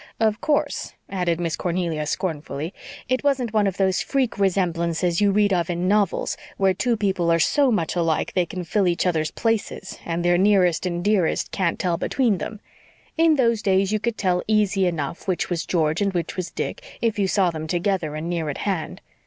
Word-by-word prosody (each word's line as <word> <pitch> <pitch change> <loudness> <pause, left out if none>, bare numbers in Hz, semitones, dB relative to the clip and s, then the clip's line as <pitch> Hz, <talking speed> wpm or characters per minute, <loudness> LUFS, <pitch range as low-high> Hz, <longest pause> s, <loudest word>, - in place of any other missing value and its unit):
Of 220 -1 +1
course," 295 -2 -1 0.2
added 175 -3 0
Miss 165 -3 -1
Cornelia 170 -4 -2
scornfully, 160 -1 -3 0.3
"it 255 +2 0
wasn't 260 -6 +1
one 210 -2 +3
of 195 - -2
those 190 -1 +2
freak 260 -6 -1
resemblances 175 -2 +1
you 205 - +4
read 205 0 +3
of 175 -2 0
in 175 +1 -1
novels 205 -1 +1 0.2
where 190 -1 +3
two 235 +5 0
people 190 -5 +1
are 165 - +4
so 275 - +3
much 170 -7 0
alike 165 -3 +1
that - - -17
they 180 -2 +2
can 180 +1 -5
fill 190 +3 +1
each 175 +1 +1
other's 160 -3 +1
places 225 -4 -2
and 170 +1 -2
their 175 0 +4
nearest 185 -4 +3
and 175 -1 -3
dearest 200 -5 +1
can't 185 -4 0
tell 175 -2 0
between 230 -5 +1
them. 215 - -5 0.6
In 325 -1 +4
those 230 -5 +2
days 195 -1 +2
you 215 - +1
could 235 +1 -2
tell 180 -2 +1
easy 205 -3 +2
enough 165 0 -4
which 180 -1 -1
was 170 -1 -2
George 160 0 +1
and 200 -1 +1
which 170 - -2
was 185 -2 -3
Dick, - - -4 0.2
if 225 -2 0
you 195 - +2
saw 185 -2 +2
them 160 -1 -5
together 175 -3 -1
and 155 +2 -4
near 170 -3 -2
at 140 - -4
hand. 190 -6 -2
185 Hz, 200 wpm, -23 LUFS, 170-210 Hz, 0.6 s, you